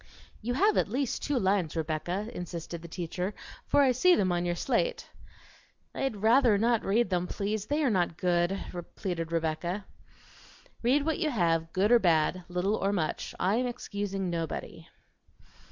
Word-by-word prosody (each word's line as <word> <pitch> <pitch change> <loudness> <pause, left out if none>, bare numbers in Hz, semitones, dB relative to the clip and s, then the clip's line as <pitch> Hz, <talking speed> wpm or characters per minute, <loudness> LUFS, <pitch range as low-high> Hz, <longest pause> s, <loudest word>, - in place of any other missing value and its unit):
"You 245 +3 -2
have 410 +8 +3
at - - +3
least 255 +2 -1
two 290 -2 0
lines, 190 -6 +1
Rebecca," 165 +5 -2
insisted 170 -1 -6
the 170 - -9
teacher, 180 +3 -4 0.3
"for 285 - +4
I 265 - +4
see 355 +9 +5
them 185 - +1
on 175 0 0
your 175 0 0
slate." 470 - -1 0.9
"I'd 270 -4 -2
rather 230 -1 +5
not 230 +1 +2
read 225 +3 +1
them, 180 0 0
please; 210 +2 -3
they 300 +2 +1
are 265 - +3
not 175 -4 0
good," 175 +1 +1 0.4
pleaded 165 -3 -3
Rebecca. 170 +4 -2 1.0
"Read 275 +5 +2
what 320 +1 0
you 320 -4 +1
have, 165 - +1
good 200 +4 +2
or 240 - +7
bad, 175 -1 +2
little 180 +4 0
or 195 - 0
much; 165 -6 -2
I 195 +4 +2
am 250 +1 +1
excusing 200 -6 -3
nobody." 165 -3 -4
195 Hz, 165 wpm, -29 LUFS, 175-240 Hz, 1.0 s, or